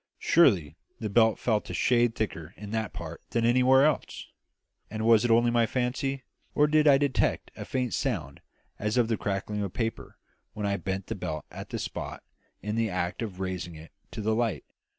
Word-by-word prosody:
Surely 95 - +3 0.2
the 110 -3 -3
belt 110 0 +4
felt 110 -3 0
a - - -4
shade 120 -2 +2
thicker 95 -6 -4
in 105 0 -8
that 110 -2 -2
part - - -8
than 115 -1 0
anywhere 130 +3 +5
else! 155 -3 -2 0.6
And 110 0 -3
was 115 -1 +6
it 120 - +1
only 120 +1 +4
my 120 -1 +3
fancy, 130 +3 -2 0.3
or 150 - +5
did 155 0 +3
I 140 -2 +7
detect 140 -1 0
a - - -7
faint 125 -2 -2
sound 90 - -2 0.4
as 105 +3 -1
of 120 -2 +3
the 115 - +2
crackling 100 +1 -3
of 100 -3 -3
paper 115 -1 -4 0.4
when 105 - -4
I 100 0 0
bent 95 0 -3
the - - -4
belt 75 -1 -5
at - - -8
that - - -3
spot - - -5 0.4
in 105 +2 -2
the 115 -1 +1
act 90 +1 -2
of 100 -5 -5
raising 90 -3 -4
it 80 +1 -12 0.2
to 110 - -6
the 110 +1 +1
light? 115 -3 -1
110 Hz, 195 wpm, -28 LUFS, 100-125 Hz, 0.6 s, I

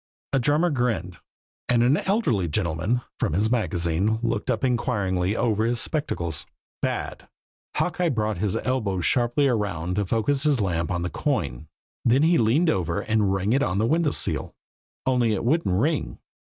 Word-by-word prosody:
A 135 - +3
drummer 150 +7 +2
grinned; 110 - -1 0.5
and 120 -1 +4
an 125 +4 +4
elderly 155 - 0
gentleman, 90 +7 -1 0.2
from - - 0
his 105 +6 +1
magazine, 95 -2 +1
looked 115 -2 -1
up - - 0
inquiringly 105 -7 0
over 110 -3 +1
his 120 +1 0
spectacles. 85 - -2 0.3
"Bad!" - - -3 0.5
Hawkeye 180 -1 0
brought 110 - -1
his 100 -1 0
elbow 110 -8 -1
sharply 120 - +2
around 95 -7 -1
to 105 - +1
focus 115 +7 +1
his 145 -3 +2
lamp 85 -4 -1
on 85 -3 -1
the 90 - -3
coin; - - -2 0.4
then 125 +5 +3
he 165 +1 +4
leaned 140 +10 +3
over 85 - -1
and 110 -3 +1
rang 95 +3 0
it 135 - +2
on 90 -5 0
the 110 - +2
window 160 +5 +2
sill - - -1 0.5
only 125 -4 +2
it 105 - -3
wouldn't 120 - +1
ring. 155 +4 -1
110 Hz, 165 wpm, -24 LUFS, 95-130 Hz, 0.5 s, and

